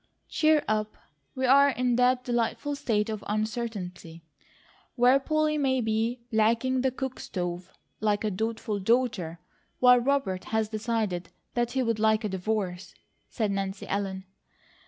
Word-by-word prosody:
"Cheer 310 -1 +3
up! 215 0 -1 0.4
We're 270 +2 +5
in 250 -1 +2
that 250 0 +3
delightful 245 +4 -1
state 215 -6 0
of 215 -2 -4
uncertainty 210 -6 -4 0.7
where 250 +2 +5
Polly 305 +1 0
may 260 -2 +2
be 225 +1 -1
blacking 235 +4 +2
the 265 - +2
cook 260 0 -5
stove, 175 0 -4 0.3
like 210 -1 +1
a 215 - 0
dutiful 220 +1 -2
daughter; 205 -6 0 0.4
while 250 0 +6
Robert 240 -8 0
has 220 -1 -1
decided 215 -5 -2 0.2
that 240 0 -1
he'd 230 -4 0
like 220 0 +3
a 210 - -1
divorce," 190 -1 -3 0.3
said 215 -4 -1
Nancy 195 0 -3
Ellen. 195 -1 -3
220 Hz, 135 wpm, -27 LUFS, 205-250 Hz, 0.7 s, while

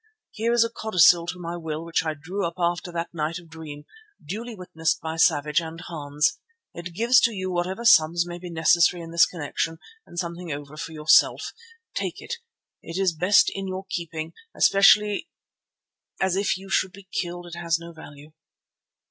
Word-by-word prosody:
Here 230 +2 -1
is 235 -1 +5
a 230 - -1
codicil 180 -6 +4
to 180 - -4
my 170 -1 -5
will 160 -1 -5
which 170 - 0
I 155 -1 -2
drew 180 +8 -5
up 170 0 -2
after 175 0 -1
that 170 0 -4
night 160 0 -2
of 170 -2 -13
dream, 150 -2 -9 0.4
duly 220 +8 -6
witnessed 165 -4 -2
by 160 0 -5
Savage 150 -1 +3
and 165 0 -8
Hans. 155 +5 -1 0.3
It 170 0 -8
leaves 240 +3 +5
to 230 - +3
you 185 -3 -4
whatever 185 +6 -2
sums 170 -4 +5
may 175 0 -7
be 180 0 -8
necessary 170 +1 +3
in 165 - -9
this 170 0 +5
connexion 165 0 -3 0.3
and 175 - -13
something 170 -1 -4
over 145 0 -7
for 165 +1 -6
yourself. 155 0 +3 0.4
Take - - -3
it, 475 - -6 0.4
it 165 - -7
is 190 -3 +2
best 180 +6 +4
in 195 0 -4
your 190 +1 -5
keeping, 165 -1 -4 0.2
especially 205 +6 +4 0.9
as 190 -1 +1
if 195 -1 +1
you 195 +1 -12
should 190 -1 0
be 195 0 -14
killed 175 0 -6
it 175 - -10
has 170 -1 +1
no 170 0 -10
value." 150 -1 -13
170 Hz, 180 wpm, -25 LUFS, 160-190 Hz, 0.9 s, is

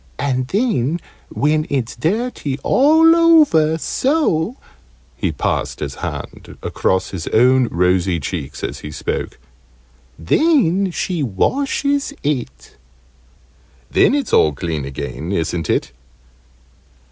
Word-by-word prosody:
And 130 -2 -1
then, 180 - 0 0.3
when 155 +1 0
it's 130 -5 -2
dirty 165 - -2
all 320 +4 +5
over 300 - +4
so 255 - 0 0.3
" - - -33
(he - - -1
passed - - -2
his - - -4
hand - - -7
across 95 0 -1
his 90 -4 -6
own 125 +2 +4
rosy 90 -1 +1
cheeks 70 -2 -5
as - - -4
he 75 - -8
spoke) 75 - -4 0.8
"then 195 - +2
she 175 -1 -2
washes 280 - 0
it." 125 - -4 1.1
"Then - - +4
it's 280 -5 -2
all 75 - +4
clean 80 -1 -4
again, 70 +3 -6
isn't 85 -3 -2
it?" - - 0
140 Hz, 110 wpm, -18 LUFS, -, 1.1 s, all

